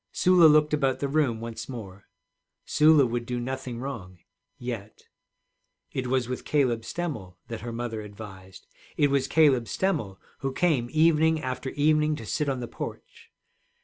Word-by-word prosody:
Sula 180 -2 +6
looked 150 0 +4
about 135 -3 +1
the 140 - -1
room 140 -6 +1
once 115 +1 -7
more. 100 -6 -9 0.6
Sula 150 -2 +5
would 120 0 -2
do 120 +1 -3
nothing 130 -1 -4
wrong 115 -9 -6 0.4
yet. 115 -4 -7 0.9
It 130 -1 -2
was 130 -1 +1
with 125 0 -4
Caleb 125 -6 +1
Stemmel 115 - -5
that 115 - -5
her 120 - -5
mother 115 -1 -4
advised, 100 -3 -11 0.3
it 145 -1 +3
was 135 -1 +1
Caleb 140 -5 +4
Stemmel 115 - -1 0.2
who 135 -1 -3
came 140 -9 +1
evening 160 0 +4
after 130 +1 -3
evening 150 +1 +2
to 115 - -8
sit 150 +6 -1
on 130 -2 -2
the 120 - -4
porch. - - -8
130 Hz, 155 wpm, -27 LUFS, 115-150 Hz, 0.9 s, Sula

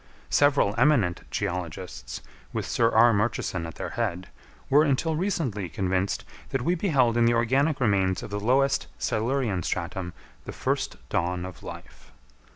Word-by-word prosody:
Several 145 -8 +4
eminent 110 -13 +3
geologists, 90 -3 -4 0.3
with - - -3
Sir 115 -1 +2
R. 115 +1 +6
Murchison 100 -5 -1
at 80 - -9
their - - -5
head, 95 -6 -2 0.4
were 145 +2 +5
until 155 +2 +1
recently 145 - -1
convinced 95 +2 -1 0.2
that 135 -2 -1
we 175 - +2
beheld 140 - +2
in 120 - +4
the 120 0 +4
organic 135 +6 +2
remains 95 -6 +1
of - - -8
the 105 - -2
lowest 135 +5 +2
Silurian 115 -4 0
stratum 85 +1 -3 0.3
the - - -6
first - - -1
dawn 90 +1 -1
of 90 -4 -9
life. - - -11
110 Hz, 150 wpm, -26 LUFS, 95-135 Hz, 0.4 s, R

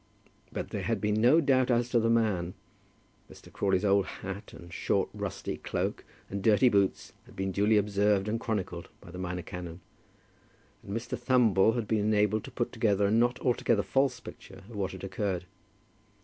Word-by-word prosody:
But - - -4
there - - -3
had - - -1
been 105 +1 0
no 125 +8 +6
doubt 130 -3 +3
as 120 0 +2
to 120 - +3
the 115 0 +1
man. 105 -7 +1 0.8
Mr. - - -15
Crawley's 95 0 +1
old 100 -1 +3
hat, 95 +1 -7
and 85 0 -12
short - - 0
rusty - - -4
cloak, - - -3 0.2
and 100 0 -4
dirty 110 +5 +5
boots, 100 -3 0
had - - -16
been 95 0 -2
duly 105 +3 +3
observed 100 0 +2
and 110 +2 -1
chronicled 95 -7 -3
by 85 - -13
the 90 - -8
minor 90 -1 -4
canon; 90 -1 -7 1.0
and 100 +3 -4
Mr. 125 +2 -4
Thumble 115 -4 +3
had 115 -3 -2
been 110 0 +1
enabled 105 0 +2
to - - -9
put 120 - -2
together 105 -4 +1
a 100 - +1
not 120 +3 +2
altogether 115 -4 +2
false 135 -1 +1
picture - - -12
of 115 - -11
what 100 -2 -2
had 95 - -9
occurred. 95 -2 -2
105 Hz, 180 wpm, -29 LUFS, 95-115 Hz, 1.0 s, no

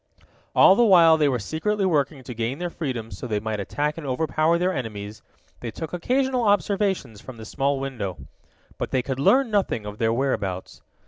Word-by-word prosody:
All - - +8
the 240 - +4
while 170 -7 +7
they 150 -2 +2
were 130 - 0
secretly 195 - -1
working 145 -5 0
to 125 - -7
gain 115 +3 -3
their 175 0 -4
freedom 125 -9 -4
so 125 - -7
they 105 -3 -1
might 110 0 -3
attack 150 - -2
and 150 - -7
overpower 155 +4 +1
their 180 +2 0
enemies, 105 - -6 0.4
they 120 - -5
took 160 +8 -7
occasional 255 +8 0
observations 195 - 0
from 130 -3 -10
the 110 - -9
small 140 +4 -1
window. 120 -9 -4 0.6
But - - -2
they 130 -1 0
could 130 0 -4
learn 255 - +3
nothing 195 - 0
of 105 0 -8
their 115 -1 +2
whereabouts. 105 -7 -2
140 Hz, 190 wpm, -24 LUFS, 115-175 Hz, 0.6 s, All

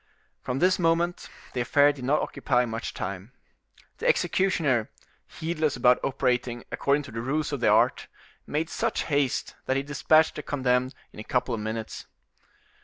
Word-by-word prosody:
From 125 - -3
this 185 +5 +3
moment 170 +1 +1 0.2
the 125 - -1
affair 145 +4 +4
did 135 -3 -10
not 140 +4 +2
occupy 125 -3 0
much 115 0 -5
time. 100 +5 -5 0.7
The - - -1
executioner, 150 - +2 0.4
heedless 160 -3 -2
about 125 0 +3
operating 125 -2 -1
according 140 +1 +1
to - - -10
the 115 +1 -4
rules 150 +5 -1
of 140 - -2
the 120 - +1
art, - - +3 0.4
made 160 +2 -2
such - - -1
haste 140 -4 0
that 130 - +1
he 135 - -1
dispatched 155 +3 +3
the - - -6
condemned 130 -2 0 0.2
in - - -11
a - - -6
couple 125 +1 -1
of 110 - -3
minutes. 110 +1 -5
135 Hz, 165 wpm, -26 LUFS, 125-150 Hz, 0.7 s, affair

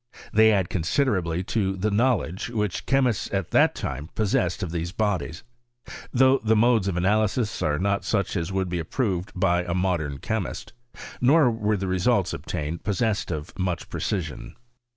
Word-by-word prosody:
They 110 0 +6
add 95 -4 +2
considerably 90 - 0
to 95 -4 +1
the 105 +3 0
knowledge 105 -5 0
which 105 -4 -2
chemists 130 -5 +1
at 95 -3 -2
that - - +4
time 70 +4 -5
possessed 95 -3 0
of 85 - -3
these 85 0 -3
bodies; 100 -5 -2 0.7
though 130 +1 +4
the 110 0 +2
modes 115 -2 +3
of 90 -3 -1
analysis 105 +4 +1
are 75 -1 +1
not 100 +3 0
such 100 -2 -1
as 85 0 -2
would 95 -1 -1
be 90 0 -2
approved 95 - -2
of - - -6
by 90 -1 +2
a 85 0 -3
modem 85 -6 -1
chemist; - - -4 0.5
nor 135 +1 +5
were 105 -2 0
the 95 - -3
results 90 -1 +1
obtained 75 +3 -4
possessed 110 0 0
of 75 -1 -5
much 90 -2 -2
pre - - -5
cision. 85 -8 -3
95 Hz, 170 wpm, -25 LUFS, 85-110 Hz, 0.7 s, They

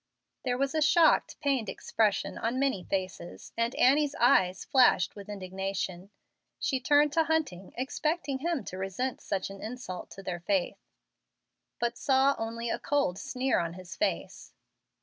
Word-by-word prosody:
There 245 -1 0
was 275 0 0
a 315 - +1
shocked, 320 +1 +4
pained 270 -8 0
expression 210 -3 0
on 235 +3 -1
many 265 -9 0
faces, 185 -2 -5
and 230 +1 0
Annie's 290 +3 +4
eyes 190 -7 +3
flashed 250 -9 +4
with 200 -1 -10
indignation. 190 -1 -4 0.5
She 265 - 0
turned 290 +2 +4
to 325 -1 +3
Hunting, 295 - -1
expecting 275 +1 -1
him 330 -1 -1
to 185 - -7
resent 195 +7 -3
such 195 0 -3
an 195 - -10
insult 220 -6 -6
to 195 - -10
their 180 -2 -4
faith, 185 +1 -1 0.9
but 235 0 -2
saw 270 0 +4
only 230 +1 -3
a - - -1
cold 280 -11 0
sneer 255 +6 0
on 170 -1 -2
his 185 +1 -9
face. 315 - -3
235 Hz, 150 wpm, -29 LUFS, 190-275 Hz, 0.9 s, shocked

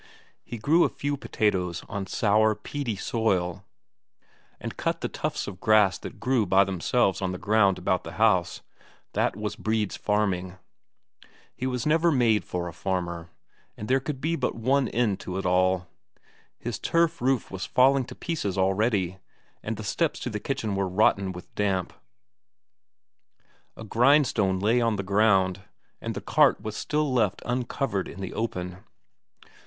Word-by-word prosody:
He 120 - -7
grew 155 +10 +3
a - - +2
few 145 0 -3
potatoes 95 -9 -1
on 100 -2 -4
sour, 110 +2 +2
peaty 140 -4 -4
soil, 95 -4 -1 1.0
and - - -6
cut - - -2
the - - -1
tufts - - -3
of 95 -2 -8
grass 105 -2 +4
that - - -9
grew 125 -5 +1
by 95 +2 +5
themselves 95 +3 0
on 95 -1 -1
the - - -4
ground 100 -1 +3
about 90 0 0
the 80 - -8
house 95 -4 +2 0.5
that - - +1
was 105 0 -4
Brede's 110 -2 -1
farming. 95 -3 -1 1.0
He 130 - -3
was 125 -2 -2
never 165 +2 +3
made 120 -6 +3
for 90 -1 -4
a 85 - -7
farmer, 85 -2 -3 0.5
and 105 - -6
there 130 +1 +3
could 135 0 -5
be 160 +4 0
but - - -1
one 130 +3 +1
end 110 -5 0
to 90 - -5
it 95 - -3
all. 90 0 +2 0.7
His 115 -3 -5
turf 165 -2 +1
roof 130 -1 0
was 95 -1 -5
falling 135 +1 +4
to - - -10
pieces 105 - -3
already, 95 -1 +1 0.4
and - - -4
the - - -6
steps - - -1
to - - -3
the 105 - -3
kitchen 115 -4 -2
were 95 -1 -1
rotten 95 0 +2
with 90 0 -11
damp; 95 -3 -1 1.8
a - - -8
grindstone 115 -5 +3
lay 115 +5 +2
on 115 -2 +2
the 100 - -3
ground, 95 -2 +2 0.4
and - - -4
the - - -4
cart - - +3
was 110 0 -6
still 150 -2 -1
left 105 -6 +1
uncovered 120 -4 -2
in - - -10
the 95 -2 -5
open. 90 -4 -4
105 Hz, 160 wpm, -26 LUFS, 95-120 Hz, 1.8 s, by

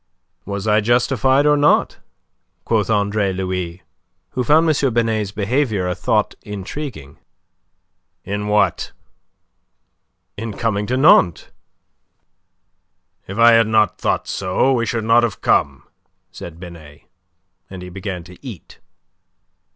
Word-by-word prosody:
"Was 100 +1 -5
I 105 0 +3
justified 130 +4 +2
or 150 0 +4
not?" 145 0 +2 0.7
quoth 110 -2 0
Andre 100 -1 0
Louis, 90 -1 -4 0.5
who 125 - -2
found 155 +6 +4
M. 140 -5 +1
Binet's 110 -3 0
behaviour 105 -1 -1
a 90 - -1
thought 100 +4 0
intriguing. 105 - -8 1.0
"In 105 +1 -4
what?" 105 0 0 1.4
"In 110 0 -5
coming 105 -2 -2
to 130 - -1
Nantes?" 100 - +4 1.8
"If 95 - -7
I 115 0 +7
had 115 -1 +4
not 110 -1 +1
thought - - -1
so, 95 +8 0
we 115 -2 0
should 115 -2 -2
not 115 +2 +4
have 115 -4 -2
come," - - +1 0.5
said 85 -1 -10
Binet, 80 -4 -12 0.7
and 95 -1 -9
he 90 - -9
began 95 -1 -6
to 90 +6 -16
eat. 115 - -11
105 Hz, 120 wpm, -19 LUFS, 95-120 Hz, 1.8 s, I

